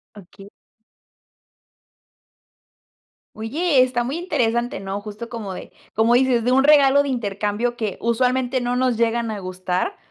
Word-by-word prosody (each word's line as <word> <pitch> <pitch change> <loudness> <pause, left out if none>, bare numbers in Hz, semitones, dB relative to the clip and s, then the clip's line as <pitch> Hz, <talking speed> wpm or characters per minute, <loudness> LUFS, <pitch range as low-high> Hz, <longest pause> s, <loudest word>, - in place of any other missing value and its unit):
Okey. 195 +1 -14 2.9
Oye, 275 +6 +1
está 250 -1 +1
muy 270 +7 -3
interesante, 240 - -1
¿no? 195 +1 -5
Justo 215 +2 -8
como 210 -6 -6
de - - -10 0.2
como 225 +2 +3
dices, 245 -2 +3
de 250 - +1
un 270 +1 +4
regalo 285 -1 +6
de 285 - -3
intercambio 215 0 -2
que 220 -5 -4
usualmente 250 +2 0
no 245 0 -1
nos 250 -1 +1
llegan 230 0 0
a 210 - -5
gustar, 185 - -3
235 Hz, 135 wpm, -21 LUFS, 210-255 Hz, 2.9 s, regalo